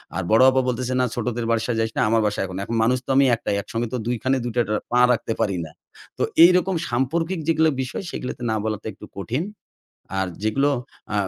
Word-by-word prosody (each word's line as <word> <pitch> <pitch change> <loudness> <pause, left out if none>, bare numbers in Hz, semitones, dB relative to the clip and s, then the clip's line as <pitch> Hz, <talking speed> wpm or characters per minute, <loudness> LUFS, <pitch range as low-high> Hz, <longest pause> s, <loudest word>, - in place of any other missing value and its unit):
আর 95 - -1
বড় 110 +3 +6
আপা 130 0 +2
বলতেছে, 125 0 -1
"না 125 - +3
ছোটদের 120 -1 -2
বাসায় 115 +1 0
যাইস 110 0 0
না। - - +2
আমার 115 0 +3
বাসায় 105 - -1
এখন।" 95 0 -7
এখন 115 - -3
মানুষ 125 +3 +3
তো - - -14
আমি 140 +1 +6
১ 115 - -13
টাই। 100 - +1
একসঙ্গে 115 +4 -3
তো - - 0
২ 120 - 0
খানে 130 +1 +2
দুইটা 120 0 0
টা 105 - 0 0.2
পা 120 - +3
রাখতে 115 -1 -2
পারি 100 -3 0
না। 80 - -11 0.5
তো - - 0 0.2
এইরকম 180 +2 +5
সাম্পর্কিক 165 +9 -1
যেগুলা 160 -1 +4
বিষয় 130 +8 -4
সেগুলাতে 125 - -5
না - - +1
বলাটা 110 -1 -3
একটু - - -12
কঠিন। 120 - -2 0.8
আর 95 - 0 0.2
যেগুলো 135 +7 +2 0.4
এ্যাঁ 105 -2 0
120 Hz, 220 wpm, -23 LUFS, 110-130 Hz, 0.8 s, বড়